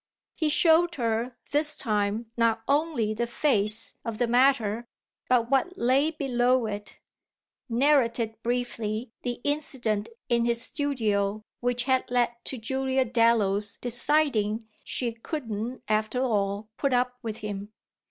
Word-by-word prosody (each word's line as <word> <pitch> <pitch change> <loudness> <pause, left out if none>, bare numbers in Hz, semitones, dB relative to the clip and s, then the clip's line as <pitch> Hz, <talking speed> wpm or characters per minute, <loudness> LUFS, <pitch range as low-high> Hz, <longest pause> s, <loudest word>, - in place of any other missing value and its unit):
He 315 -2 0
showed 335 +2 +4
her 235 0 -2
this 300 +1 +4
time 215 -2 -1
not 230 -1 +1
only 280 -7 +1
the 235 +2 -2
face 225 -5 +1
of 230 -2 -4
the 245 - +2
matter, 240 -2 +2 0.4
but 245 -1 +2
what 360 +8 +1
lay 265 +5 +3
below 255 -5 +1
it; 205 -1 -6 0.7
narrated 235 -3 +2
briefly 235 -1 -3
the 245 -1 -4
incident 265 -8 -1 0.2
in 235 -1 +2
his 235 -1 +2
studio 215 -7 -1 0.2
which 245 0 0
had 260 0 +1
led 240 -1 +2
to 265 - -2
Julia 265 +3 0
Dallow's 225 -4 +2
deciding 240 -4 +2 0.2
she 240 -2 -1
couldn't 230 -2 -5
after 215 +3 0
all 210 -3 -1
put 275 -2 0
up 250 0 0
with 220 -2 -5
him. 205 0 -5
240 Hz, 130 wpm, -27 LUFS, 220-265 Hz, 0.7 s, showed